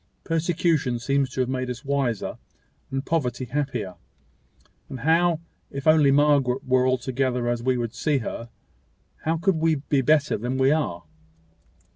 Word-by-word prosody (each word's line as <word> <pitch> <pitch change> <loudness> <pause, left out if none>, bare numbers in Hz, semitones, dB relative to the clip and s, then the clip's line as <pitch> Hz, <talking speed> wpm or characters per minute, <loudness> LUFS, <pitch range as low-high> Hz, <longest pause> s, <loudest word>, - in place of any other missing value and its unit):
Persecution 165 -5 +1
seems 135 +3 0
to 130 - -2
have 125 - 0
made 130 -1 -2
us 125 +3 -6
wiser, 135 -6 -1 0.5
and 135 0 -3
poverty 130 -6 -1
happier; 125 -8 -3 0.9
and 130 - -7
how, 165 +2 +3 0.3
if 140 0 -6
only 155 -3 +5
Margaret 140 -3 +3
were 130 0 +3
altogether 130 -1 0
as 120 -1 0
we 130 +1 +1
would 120 -1 -3
see 145 +4 0
her, 115 -1 -5 0.8
how 165 +1 +1
could 185 +1 +1
we 160 0 +2
be 140 -1 0
better 150 +2 +3
than 125 +4 -2
we 135 +1 +4
are?" 140 - -1
135 Hz, 150 wpm, -24 LUFS, 125-150 Hz, 0.9 s, only